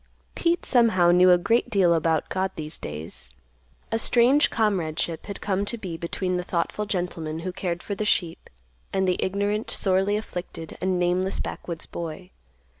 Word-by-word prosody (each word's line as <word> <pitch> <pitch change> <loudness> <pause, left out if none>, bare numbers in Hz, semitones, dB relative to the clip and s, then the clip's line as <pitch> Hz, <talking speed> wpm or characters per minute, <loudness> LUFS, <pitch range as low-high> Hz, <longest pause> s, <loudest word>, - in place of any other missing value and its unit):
Pete 340 0 0
somehow 220 -9 +4
knew 180 +1 +6
a 180 - +7
great 230 +7 +1
deal 190 -6 +4
about 160 -1 +1
God 190 0 0
these 155 0 -4
days. 75 +2 -5 0.6
A 225 - +1
strange 245 +6 +4
comradeship 170 -7 -1
had 200 - -6
come 195 -1 0
to 235 - -3
be 185 -6 -5
between 180 +2 -2
the 180 - -2
thoughtful 175 +4 -1
gentleman, 165 -5 -3
who 185 +2 -3
cared 175 -1 -3
for 205 - -3
the 200 - -2
sheep, 175 -5 0 0.4
and 190 -1 +1
the 180 - +1
ignorant, 205 +3 -1
sorely 195 +1 +2
afflicted, 175 -5 -6
and 185 0 +1
nameless 180 +2 0
backwoods 170 -2 -5
boy. 170 +2 -7
185 Hz, 165 wpm, -25 LUFS, 170-205 Hz, 0.6 s, a